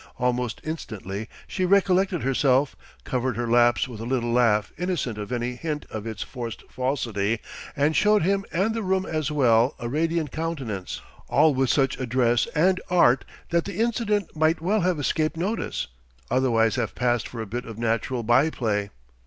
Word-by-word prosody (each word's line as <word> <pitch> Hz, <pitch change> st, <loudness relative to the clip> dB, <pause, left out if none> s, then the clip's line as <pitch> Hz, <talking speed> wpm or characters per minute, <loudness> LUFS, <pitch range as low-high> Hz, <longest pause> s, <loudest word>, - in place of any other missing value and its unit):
Almost 125 Hz, -2 st, -1 dB
instantly 110 Hz, -, -5 dB, 0.2 s
she 185 Hz, -, -3 dB
recollected 190 Hz, -1 st, +3 dB
herself, 135 Hz, +1 st, +2 dB, 0.3 s
covered 125 Hz, -2 st, -1 dB
her 120 Hz, 0 st, -1 dB
lapse 120 Hz, +1 st, +4 dB
with 120 Hz, -4 st, -9 dB
a -, -, -5 dB
little 120 Hz, -1 st, -1 dB
laugh 115 Hz, -4 st, +3 dB
innocent 170 Hz, -, -2 dB
of 105 Hz, +2 st, -6 dB
any 120 Hz, 0 st, -1 dB
hint 150 Hz, +3 st, -4 dB
of 110 Hz, 0 st, -5 dB
its 110 Hz, -2 st, -4 dB
forced 120 Hz, -3 st, -7 dB
falsity, 115 Hz, -5 st, -1 dB, 0.4 s
and 145 Hz, +3 st, +2 dB
showed 210 Hz, -2 st, +4 dB
him 195 Hz, +2 st, +1 dB
and 195 Hz, +6 st, +1 dB
the 225 Hz, -, -2 dB
room 190 Hz, -1 st, 0 dB
as 155 Hz, -2 st, -2 dB
well 125 Hz, -3 st, +3 dB
a 120 Hz, -, -5 dB
radiant 160 Hz, +2 st, 0 dB
countenance: 135 Hz, -, -4 dB, 0.3 s
all 155 Hz, -2 st, +4 dB
with 130 Hz, -1 st, +1 dB
such 135 Hz, -2 st, +2 dB
address 120 Hz, -2 st, +2 dB
and 185 Hz, +4 st, +3 dB
art 155 Hz, -8 st, +4 dB, 0.3 s
that 170 Hz, -1 st, +1 dB
the 200 Hz, -, -6 dB
incident 220 Hz, -5 st, 0 dB
might 155 Hz, +1 st, +2 dB
well 195 Hz, +6 st, +1 dB
have 180 Hz, -3 st, +1 dB
escaped 155 Hz, +3 st, 0 dB
notice, 200 Hz, +7 st, -2 dB, 0.5 s
otherwise 120 Hz, -3 st, +2 dB
have 120 Hz, -3 st, -2 dB
passed 120 Hz, -1 st, +1 dB
for 120 Hz, -, -8 dB
a 110 Hz, -, -3 dB
bit 120 Hz, +4 st, -5 dB
of 115 Hz, -2 st, -8 dB
natural 115 Hz, +2 st, -1 dB
by 120 Hz, +7 st, +4 dB
play. 105 Hz, -8 st, -1 dB
130 Hz, 170 wpm, -25 LUFS, 120-165 Hz, 0.5 s, lapse